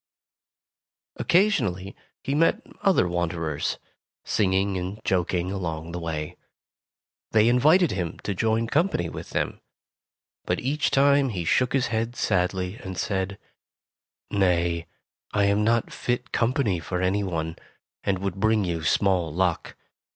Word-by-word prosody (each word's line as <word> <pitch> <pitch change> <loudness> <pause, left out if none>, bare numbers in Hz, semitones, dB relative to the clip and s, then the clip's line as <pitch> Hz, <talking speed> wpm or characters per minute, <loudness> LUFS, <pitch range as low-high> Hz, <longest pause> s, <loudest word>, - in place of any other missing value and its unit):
Occasionally 105 - +1 0.3
he 135 - -1
met 165 +3 +2 0.2
other 195 - +3
wanderers, 85 -3 -2 0.5
singing 95 0 +1
and 95 +3 -4
joking 90 -1 0
along 85 -4 -4
the 90 - -4
way. 80 -3 -4 1.0
They 110 0 +5
invited 155 +9 +5
him 90 -5 -3
to 100 - -1
join 110 +4 +1
company 145 - +1
with - - -8
them, - - -2 0.8
but - - -1
each 145 +4 0
time 140 0 +4
he 90 -7 -3
shook 125 +9 +2
his 135 -2 +1
head 115 +2 -1
sadly 95 -1 0
and 95 -4 -7
said: 95 0 -2 0.9
"Nay, 85 -4 +1 0.5
I 100 0 +2
am 100 +1 +3
not 115 +1 +1
fit 120 0 -2
company 115 -6 +1
for 90 +2 -3
any 95 +3 +1
one, 80 -3 -3 0.5
and 95 - +1
would 95 0 -4
bring 110 0 +3
you 85 -2 -2
small 90 -1 +2
luck. 90 +1 -1
95 Hz, 130 wpm, -25 LUFS, 90-115 Hz, 1.0 s, They